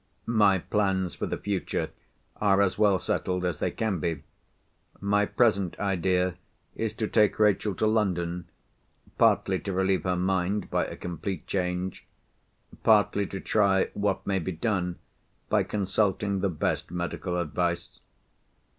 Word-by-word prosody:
"My 105 -4 +4
plans 95 -1 0
for - - -3
the - - -2
future 100 -2 -2 0.5
are 100 -2 +3
as 95 -2 +1
well 100 -2 +4
settled 90 0 -1
as 85 -4 -2
they - - 0
can 110 -6 -2
be. 80 -2 -2 0.8
My 105 0 +2
present 100 -7 +2
idea 90 -2 0 0.4
is 110 -1 -3
to 110 -2 -1
take 105 -1 +3
Rachel 105 -1 +2
to - - 0
London—partly 90 -5 -1
to 100 - -4
relieve 95 -2 +1
her 90 -1 +1
mind 95 +2 0
by - - +1
a - - -8
complete 90 +2 -5
change, 90 -1 -2 0.7
partly 105 -2 +4
to 95 - -5
try 100 -2 +2
what 105 0 -1
may 95 -1 +1
be 95 +2 -3
done 90 -2 -1 0.5
by - - +3
consulting 100 0 0
the 100 +1 +1
best 80 -4 -1
medical 90 +1 -3
advice. 85 +1 -2
95 Hz, 135 wpm, -27 LUFS, 90-105 Hz, 0.8 s, My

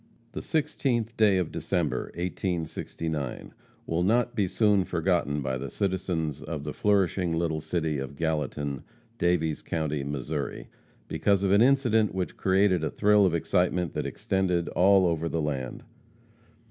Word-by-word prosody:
The - - -5
16th 130 -7 -1
day 105 -3 +4
of 90 -4 -1
December, - - -1
1869, 80 -5 -4 0.3
will 80 +1 -1
not 120 +6 +2
be 105 -5 +1
soon 105 0 +3
forgotten 85 -5 0
by 65 -1 -2
the 70 +1 -5
citizens 85 -5 -2
of 75 -1 -5
the 75 - -4
flourishing 95 -4 +1
little 80 -2 -1
city 80 -2 -1
of 65 +1 -6
Gallatin, 75 -3 -2 0.4
Daviess 80 -3 +1
county, 75 -3 -2
Missouri, 70 +1 -4 0.4
because 100 -1 +1
of 95 - +2
an 100 +2 +5
incident 120 -6 +3
which 95 -1 -2
created 95 -2 +2
a 80 - 0
thrill 105 -1 +4
of 85 - 0
excitement 90 0 0
that - - -2
extended 90 -3 -1
all 95 +1 +4
over 85 -1 0
the 80 - -1
land. 70 -5 -3
85 Hz, 145 wpm, -27 LUFS, 75-100 Hz, 0.4 s, an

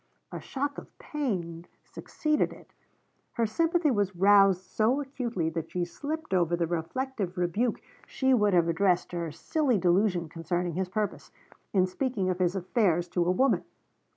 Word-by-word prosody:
A - - -5
shock 285 +1 -3
of - - -17
pain 180 - -4 0.2
succeeded 305 -1 -1
it. - - -15 0.6
Her 235 - +1
sympathy 330 +7 +1
was 205 -4 0
roused 195 0 +5
so 220 +7 +1
acutely 245 - -3
that 165 -1 -4
she 180 -1 -1
slipped 305 - -5
over 175 -2 +2
the 170 -1 0
reflective 185 +4 -3
rebuke 190 +7 0 0.3
she 265 -1 +1
would 210 -5 +3
have 170 -1 +4
addressed 180 +1 +1
to 175 - -4
her 170 -2 -3
silly 255 - 0
delusion 180 -1 +2
concerning 170 +2 -3
his 185 +2 -2
purpose 210 +2 -3 0.4
in 185 -2 +3
speaking 195 -1 -1
of 180 - -4
his 180 +1 +1
affairs 180 -2 +1
to 175 - +1
a - - +1
woman. 255 +8 +2
190 Hz, 160 wpm, -28 LUFS, 175-250 Hz, 0.6 s, roused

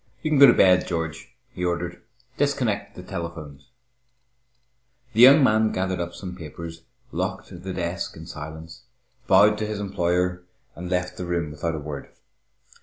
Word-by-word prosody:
"You 155 - -1
can 150 - +3
go 140 - +11
to 120 - +7
bed, 90 -1 +4
George," 80 -3 -4 0.2
he 90 - -6
ordered. 85 0 -2 0.3
"Disconnect 130 -8 -1
the 90 - -9
telephones." 85 -7 -7 1.4
The 115 - +3
young 135 +4 +9
man 110 -3 +3
gathered 95 -1 -2
up 85 0 -4
some 90 -2 -7
papers, 85 0 -9 0.3
locked - - -3
the 95 +1 -5
desk 90 0 -4
in 80 - -9
silence, 80 +2 -9 0.4
bowed 105 0 +5
to 110 - -2
his 105 -1 -4
employer, 90 -2 0 0.3
and 90 +1 -7
left 90 -1 -2
the 90 - -4
room 85 -3 -1
without 80 +2 -3
a - - -4
word. 75 -1 -7
90 Hz, 160 wpm, -24 LUFS, 85-100 Hz, 1.4 s, go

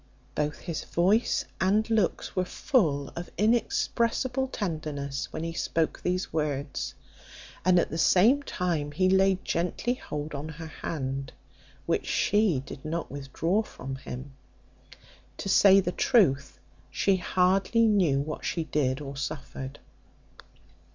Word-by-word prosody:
Both 150 0 -2
his 170 -3 -4
voice 195 +7 +2
and 205 +4 +2
looks 225 -3 0
were 185 - +2
full 160 - +1
of 170 +1 -7
inexpressible 235 +3 +1
tenderness 155 - -4
when 155 - -4
he 165 0 -3
spoke 165 -1 -1
these 180 -1 -1
words; 145 -3 -2 0.7
and 180 0 +5
at 175 - +2
the 160 - -3
same 225 - +5
time 165 - -2
he 185 +4 +2
laid 190 0 +3
gently 180 +8 0
hold 150 -10 -6
on 145 +2 -5
her 160 +1 -8
hand, 135 -4 -4 0.5
which - - 0
she 205 -8 +2
did 135 - -9
not 165 +2 -3
withdraw 145 +8 -1
from 135 - -7
him; 135 0 -8 1.1
to - - -5
say 195 0 +7
the 180 -2 0
truth, 170 - +2 0.3
she 195 -1 +2
hardly 190 +5 +2
knew 180 -11 +3
what 155 +2 -5
she 165 - -1
did 140 -3 0
or 140 -1 -6
suffered. 135 -1 -5
170 Hz, 130 wpm, -28 LUFS, 145-195 Hz, 1.1 s, say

